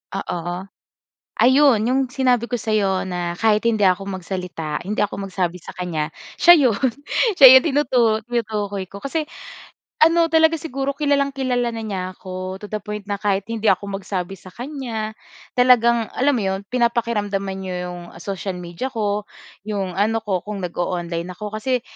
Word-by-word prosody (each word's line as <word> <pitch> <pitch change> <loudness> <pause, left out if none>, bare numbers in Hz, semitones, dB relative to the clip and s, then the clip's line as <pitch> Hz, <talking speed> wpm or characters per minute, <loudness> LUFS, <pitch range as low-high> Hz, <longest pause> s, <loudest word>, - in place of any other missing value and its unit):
Oo. 175 -1 -4 0.8
Ayun 260 -1 +5
'yong 260 +2 +2
sinabi 250 -4 +2
ko 245 - -1
sa'yo 200 -3 +1
na 175 -1 -2
kahit 215 0 +2
hindi 230 -2 +2
ako 185 +1 +3
magsalita, 180 -4 -4
hindi 210 +3 -2
ako 200 -1 -1
magsabi 180 -2 -2
sa - - -10
kanya, 165 -4 -3 0.2
siya 345 - +8 0.2
'yon, 225 +4 +1 0.5
'siya 265 -3 +11
yong 260 - +6
tinutu 280 -5 +2 0.3
tinutukoy 210 -4 -2
ko. 200 - -10
Kasi 305 +5 -2 0.8
ano 330 +1 +4
talaga 320 0 +4
siguro 275 -2 -2
kilalang-kilala 275 -4 0
na 225 - -5
niya 200 -4 -3
ako 185 +1 -6
to 210 - -7
the 215 - -2
point 210 0 -7
na 205 - -1
kahit 200 -1 0
hindi 225 -1 -3
ako 200 - -4
magsabi 195 -1 -4
sa 185 +1 -14
kanya, 240 -5 -5 0.4
talagang 235 -2 +5
alam 280 +2 +2
mo - - -2
'yon 190 +1 -1
pinapakiramdaman 210 -5 0
n'ya 185 -1 -4
'yong 175 0 -8 0.2
social 195 0 -4
media 175 +6 -5
ko, 210 -4 -2 0.4
'yong 195 -3 -3
ano 220 +2 +1
ko 195 -3 -2
kung 205 -3 -5
nag-oonline 175 -1 -3
ako. 210 +1 -7
Kasi 250 +1 0
210 Hz, 160 wpm, -21 LUFS, 190-245 Hz, 0.8 s, siya